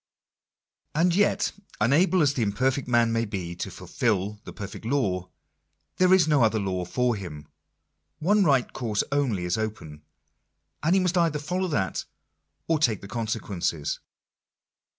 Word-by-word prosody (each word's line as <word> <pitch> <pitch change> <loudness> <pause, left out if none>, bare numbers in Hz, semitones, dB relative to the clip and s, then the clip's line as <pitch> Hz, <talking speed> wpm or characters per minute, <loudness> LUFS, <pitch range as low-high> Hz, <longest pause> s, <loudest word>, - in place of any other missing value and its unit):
And 170 +3 +3
yet, 205 +3 +2 0.3
unable 160 - +4
as 145 -1 +3
the 130 - -2
imperfect 125 +6 0
man 120 -2 +3
may 115 0 +1
be 95 -6 -4
to - - -4
fulfil 105 -2 -2
the - - -7
perfect 100 0 -8
law, 100 -8 0 0.7
there 185 0 +4
is 185 -4 +6
no 150 -4 +3
other 110 -1 +3
law 95 -3 -2
for 125 +5 +1
him. 75 -7 -8 0.7
One 205 +5 +3
right 135 -7 +2
course 110 -5 -1
only 125 -11 0
is 90 +4 0
open; 80 -9 -5 0.8
and 165 +4 +3
he 190 - +4
must 180 0 +1
either 165 -3 +2
follow 180 +6 -2
that 95 - -1 0.6
or 160 -2 +2
take 115 -9 +2
the 100 - -9
con 115 +1 -3
sequences. 90 -8 -2
115 Hz, 150 wpm, -26 LUFS, 100-150 Hz, 0.8 s, is